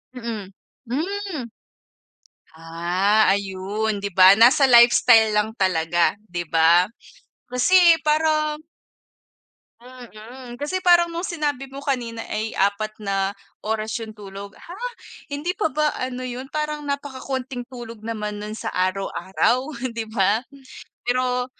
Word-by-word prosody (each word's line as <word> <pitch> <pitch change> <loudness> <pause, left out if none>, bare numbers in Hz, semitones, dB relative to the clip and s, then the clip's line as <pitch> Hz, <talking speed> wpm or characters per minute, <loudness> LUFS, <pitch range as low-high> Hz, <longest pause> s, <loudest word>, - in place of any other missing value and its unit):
Mm. 230 -5 -5 0.4
Hmm. 350 - -3 1.1
Ah, 175 +6 +1
ayun, 200 +2 -2
'di 200 0 -4
ba? 185 +1 +8
Nasa 250 +5 +6
lifestyle 235 -2 +6
lang 210 0 +1
talaga, 175 0 +1
di 175 -3 -5
ba? 170 +3 +4 0.6
Kasi 250 +10 +3 0.3
parang 305 0 +1 1.2
Mm. 245 0 -12
Kasi 365 +7 -3
parang 345 -1 +4
nung 340 - -3
sinabi 290 -6 -3
mo 275 +2 -10
kanina 235 -4 -3
ay 215 +1 -3
4 215 +2 0
na 195 -1 -2 0.2
oras 215 0 -3
yung 225 - -7
tulog. 200 0 -10
Ha? 345 - -11 0.6
Hindi 295 +5 -3
pa 370 -3 -1
ba 300 +1 0
ano 255 0 -4
yun, 255 +2 -6
parang 300 0 -3
napakakonting 270 -2 -4
tulog 235 -3 -9
naman 210 -2 -5
nun 215 +1 -6
sa - - -5
araw-araw, 195 +7 0
hindi 230 -3 -5
ba? 210 +1 +1 0.6
Pero 250 0 0
230 Hz, 120 wpm, -22 LUFS, 200-275 Hz, 1.2 s, ba